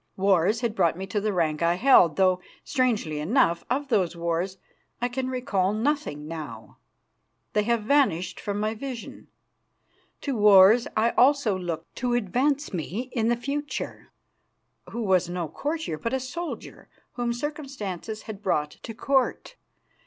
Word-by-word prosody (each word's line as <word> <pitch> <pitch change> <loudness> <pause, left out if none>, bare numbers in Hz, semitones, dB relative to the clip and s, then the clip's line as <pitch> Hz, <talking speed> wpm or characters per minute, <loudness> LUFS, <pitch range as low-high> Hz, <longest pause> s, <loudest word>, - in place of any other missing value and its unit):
Wars 195 +3 +3
had 235 -3 0
brought 175 -5 +2
me 190 - -4
to 200 +2 -2
the 215 +1 0
rank 160 -4 0
I 170 +1 +3
held, 185 - +5
though, 185 -1 +3 0.2
strangely 230 - 0
enough, 170 - +2
of 275 +3 -1
those 185 -8 +1
wars 170 +3 -2 0.4
I 245 - +1
can 255 +1 -3
recall 215 -7 0
nothing 225 - -1
now; 150 -9 -8 0.7
they 210 - +3
have 235 -1 +1
vanished 230 - +2
from 205 0 -3
my 215 +1 0
vision. 245 +1 -7 0.9
To 280 -3 -2
wars 210 +2 +7
also 240 0 +3
I - - -4
looked 175 -3 -5
to 245 -1 0
advance 265 +6 0
me 200 - -4
in 230 -3 +1
the 240 - +3
future, 290 +4 -5 0.8
who 235 0 -4
was 185 -3 +2
no 175 -2 -3
courtier, 290 - -3
but 230 - -3
a 265 - +1
soldier, 325 +7 -7 0.2
whom 240 -1 -1
circumstances 235 - -5
had 210 -2 -8
brought 150 -7 0
to 225 - -8
Court. 270 - 0
215 Hz, 150 wpm, -26 LUFS, 180-255 Hz, 0.9 s, wars